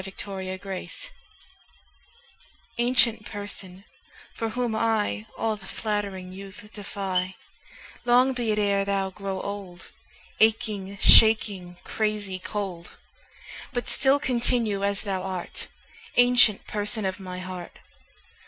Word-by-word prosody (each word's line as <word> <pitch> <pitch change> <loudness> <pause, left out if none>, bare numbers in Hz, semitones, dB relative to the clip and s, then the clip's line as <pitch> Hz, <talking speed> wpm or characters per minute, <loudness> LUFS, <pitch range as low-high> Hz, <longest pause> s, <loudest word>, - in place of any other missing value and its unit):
7 195 0 -8
Autoplay 190 - -5 1.7
Ancient 240 -2 +4
Person, 200 -3 -6 0.5
for 225 -2 -2
whom 240 -1 -1
I 210 - 0
All 220 -1 0
the 195 -2 -13
flattering 200 -4 -3
youth 195 +1 -10
defy, 190 -2 -2 0.7
Long 250 +2 +5
be 240 -3 -1
it 210 - 0
e'er 200 -1 +2
thou 195 -1 0
grow 195 -1 -4
old, 195 -3 -7 0.5
Aching, 215 -3 +2
shaking, 200 -6 +6
crazy 210 -3 -2
cold; 185 -3 -5 0.8
But 245 -1 -2
still 270 0 +3
continue 235 -6 0
as 200 0 0
thou 195 -3 -2
art, 185 -1 -5 0.5
Ancient 245 -4 +5
Person 210 0 -1
of 190 +1 -2
my 185 -1 -6
heart. 185 -1 -7
200 Hz, 110 wpm, -26 LUFS, 190-220 Hz, 1.7 s, shaking